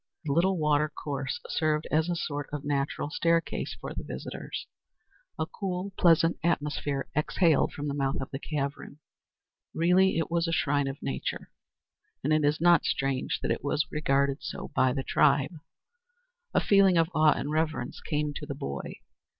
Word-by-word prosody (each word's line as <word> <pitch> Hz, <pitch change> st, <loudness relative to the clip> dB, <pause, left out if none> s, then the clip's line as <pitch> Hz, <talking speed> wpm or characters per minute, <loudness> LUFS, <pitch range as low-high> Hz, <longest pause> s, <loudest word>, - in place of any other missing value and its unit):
The 140 Hz, -, 0 dB
little 185 Hz, +4 st, +3 dB
watercourse 150 Hz, -3 st, -1 dB
served 155 Hz, -1 st, 0 dB
as 160 Hz, +3 st, +2 dB
a 175 Hz, -, 0 dB
sort 145 Hz, -4 st, -4 dB
of 145 Hz, -1 st, -5 dB
natural 145 Hz, +1 st, -1 dB
staircase 165 Hz, +1 st, 0 dB
for -, -, -6 dB
the -, -, -5 dB
visitors. -, -, -6 dB, 0.7 s
A -, -, 0 dB
cool, 190 Hz, -1 st, -4 dB
pleasant 165 Hz, -1 st, +4 dB
atmosphere 145 Hz, -4 st, -1 dB
exhaled 155 Hz, +1 st, +2 dB
from 145 Hz, 0 st, -4 dB
the 140 Hz, -, -1 dB
mouth 135 Hz, -1 st, -1 dB
of 130 Hz, -, -6 dB
the 135 Hz, -, -4 dB
cavern. 140 Hz, -1 st, -4 dB, 0.8 s
Really 180 Hz, +2 st, +4 dB
it 165 Hz, 0 st, -1 dB
was 170 Hz, 0 st, +1 dB
a -, -, -1 dB
shrine 145 Hz, -3 st, +1 dB
of 135 Hz, +1 st, -6 dB
nature, 135 Hz, -, -4 dB, 0.7 s
and 150 Hz, +3 st, +2 dB
it 155 Hz, 0 st, +3 dB
is 145 Hz, +1 st, +2 dB
not 170 Hz, -1 st, +5 dB
strange 135 Hz, -1 st, -1 dB
that -, -, 0 dB
it -, -, -2 dB
was 145 Hz, +1 st, +1 dB
so 155 Hz, -, -24 dB
regarded 140 Hz, -2 st, +1 dB, 0.3 s
by 130 Hz, -, +3 dB
the 135 Hz, +1 st, -2 dB
tribe. 140 Hz, +3 st, +3 dB, 1.0 s
A -, -, +6 dB
feeling 195 Hz, -3 st, +5 dB
of 165 Hz, +1 st, +2 dB
awe 155 Hz, -1 st, +5 dB
and 145 Hz, -, -3 dB
reverence 155 Hz, -5 st, -1 dB
came 150 Hz, -1 st, -1 dB
to 150 Hz, -, -8 dB
the 140 Hz, -, -4 dB
boy. 70 Hz, -, -5 dB
150 Hz, 165 wpm, -28 LUFS, 140-165 Hz, 1.0 s, A